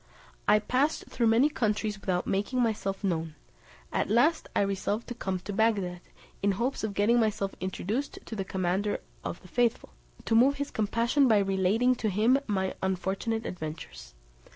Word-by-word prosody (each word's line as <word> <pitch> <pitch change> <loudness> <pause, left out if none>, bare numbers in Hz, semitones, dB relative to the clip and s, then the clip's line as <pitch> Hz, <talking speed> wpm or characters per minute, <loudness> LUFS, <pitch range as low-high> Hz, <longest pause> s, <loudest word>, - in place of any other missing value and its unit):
I 210 - +6
passed 260 +8 0
through 235 - +1
many 230 +6 +5
countries 215 -7 -1
without 180 -2 -1
making 205 +6 -1
myself 210 -4 -1
known; 165 -4 -1 0.6
at - - 0
last 270 +10 +3
I - - +3
resolved 200 +2 -1
to - - -3
come 190 -5 -3
to 205 - -6
Bagdad, 195 -5 +1 0.4
in 200 0 +2
hopes 240 +7 -2
of 210 -2 -2
getting 230 +4 +3
myself 205 -3 0
introduced 205 +8 -3
to 225 - -6
the 195 - -2
commander 190 +2 -1 0.2
of - - -4
the - - -13
faithful, 235 +3 0 0.4
to - - 0
move 255 +5 +5
his 285 0 -4
compassion 235 +6 +2
by 220 -3 +5
relating 200 +5 +2
to 220 - 0
him 220 +7 +3
my 190 -3 0
unfortunate 190 +4 -1
adventures. 150 - -7
210 Hz, 165 wpm, -29 LUFS, 190-235 Hz, 0.6 s, I